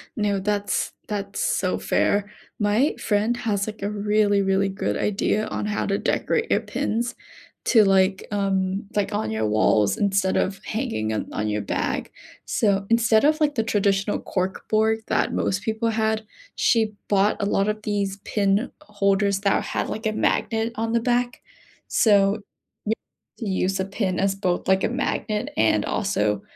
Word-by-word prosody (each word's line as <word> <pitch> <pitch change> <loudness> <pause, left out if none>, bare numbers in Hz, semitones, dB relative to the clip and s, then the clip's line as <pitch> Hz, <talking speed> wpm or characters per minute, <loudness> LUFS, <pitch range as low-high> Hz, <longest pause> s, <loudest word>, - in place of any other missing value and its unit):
No, 205 -3 0
that's 205 +1 -1
that's 205 - -4
so - - 0
fair. 205 0 +1 0.3
My 215 +7 +2
friend 215 +2 +1
has 205 -4 -1
like 215 0 -7
a 200 - -1
really, 205 0 +2
really 195 0 +1
good 195 - -2
idea 210 +1 0
on - - -3
how 210 0 -1
to 195 - 0
decorate 455 0 0
your - - +2
pins 235 +2 -2 0.5
to, 225 -3 +6
like, 190 -1 +2
um, 195 -1 0
like 205 0 0
on 205 - -1
your 110 0 -1
walls 105 -1 +3
instead 195 -2 +1
of 195 +1 -1
hanging 215 - -2
on 110 - -3
on 105 - -1
your 105 0 -1
bag. 100 - -2 0.3
So 200 -2 +1
instead 230 -1 +4
of 310 +1 +3
like 295 -1 +2
the 225 - +1
traditional 200 -2 +1
cork 185 0 -3
board 220 +1 +2
that - - +1
most 195 +1 -1
people 220 +1 -1
had, 220 0 0 0.3
she 220 -2 +2 0.2
bought 200 0 +3
a - - +1
lot 200 0 +1
of 215 0 -2
these 200 -2 -1
pin 200 +2 +1
holders 200 -4 +1
that 200 -1 +2
had - - -2
like 220 +1 -5
a 215 - +2
magnet 225 +1 0
on 225 +1 -2
the 235 - +3
back. 245 0 0 0.5
So 205 -1 +3 0.5
y 220 - +1 0.5
you 200 -6 -1
use 190 +1 0
a 190 - 0
pin 195 -2 -2
as 195 0 +1
both 185 -3 -1
like 190 0 +3
a - - +2
magnet 220 -4 -2
and 110 -1 +3
also 105 - 0
205 Hz, 170 wpm, -24 LUFS, 195-220 Hz, 0.5 s, to